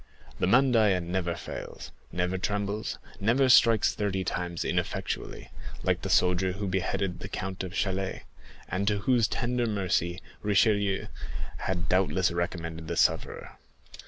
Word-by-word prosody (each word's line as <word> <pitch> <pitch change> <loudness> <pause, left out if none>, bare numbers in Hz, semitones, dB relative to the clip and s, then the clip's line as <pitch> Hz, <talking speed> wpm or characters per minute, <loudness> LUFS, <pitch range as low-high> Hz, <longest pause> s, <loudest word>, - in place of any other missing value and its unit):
The - - +2
_mandaïa_6 110 -6 +4
never 85 0 -1
fails, - - -8 0.2
never 90 +2 -1
trembles, 105 +2 -2 0.2
never 125 +6 +3
strikes 115 -3 +6
thirty 95 -2 -1
times 90 -2 -3
ineffectually, - - -3 0.3
like - - +1
the - - -4
soldier 90 +1 +3
who 100 +2 -4
beheaded 95 0 -1
the 95 - -7
Count 95 -1 -4
of 95 -1 -6
Chalais, 95 -1 -1 0.4
and 100 +2 -2
to 105 0 +3
whose 120 -1 +3
tender 120 0 -1
mercy 95 -4 0 0.2
Richelieu 100 -1 +2 0.5
had 90 -2 -2
doubtless 95 -1 +2
recommended 85 -2 -3
the - - -3
sufferer. - - 0
95 Hz, 130 wpm, -28 LUFS, 90-105 Hz, 0.5 s, strikes